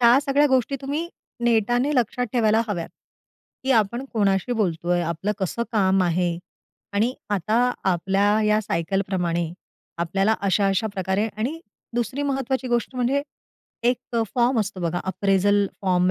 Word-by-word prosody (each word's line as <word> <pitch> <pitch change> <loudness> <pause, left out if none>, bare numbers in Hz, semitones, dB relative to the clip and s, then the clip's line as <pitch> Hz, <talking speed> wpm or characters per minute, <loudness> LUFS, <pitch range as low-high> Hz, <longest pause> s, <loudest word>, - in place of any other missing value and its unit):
ह्या 240 +2 +7
सगळ्या 285 +1 +3
गोष्टी 260 +1 +2
तुम्ही 295 +5 -3 0.4
नेटाने 240 +4 +2
लक्षात 245 0 +1
ठेवायला 220 -2 +3
हव्यात. 175 -5 -3 0.8
की 265 - 0
आपण 235 +2 +1
कोणाशी 200 +1 +1
बोलतोय, 175 -5 0
आपलं 170 +5 -2
कसं 195 +5 -2
काम 195 -3 +3
आहे 175 0 0 0.5
आणि 220 +5 +1 0.2
आता 220 +6 +2 0.2
आपल्या 195 +4 +2
या 210 0 +3
सायकल 195 -1 -1
प्रमाणे 170 -3 -1 0.5
आपल्याला 195 +6 +1
अशा, 200 0 +2
अशा 195 +3 +1
प्रकारे 190 +3 0
आणि 265 +10 -2 0.3
दुसरी 240 +4 -1
महत्वाची 265 -2 -1
गोष्ट 240 +2 0
म्हणजे, 255 +3 +1 0.6
एक 245 0 0 0.2
फॉर्म 240 -1 +3
असतो 200 -2 -4
बघा 175 0 -1
अप्रेजल 195 +2 +2 0.2
फॉर्म 180 -1 +3
210 Hz, 140 wpm, -23 LUFS, 190-245 Hz, 0.8 s, ह्या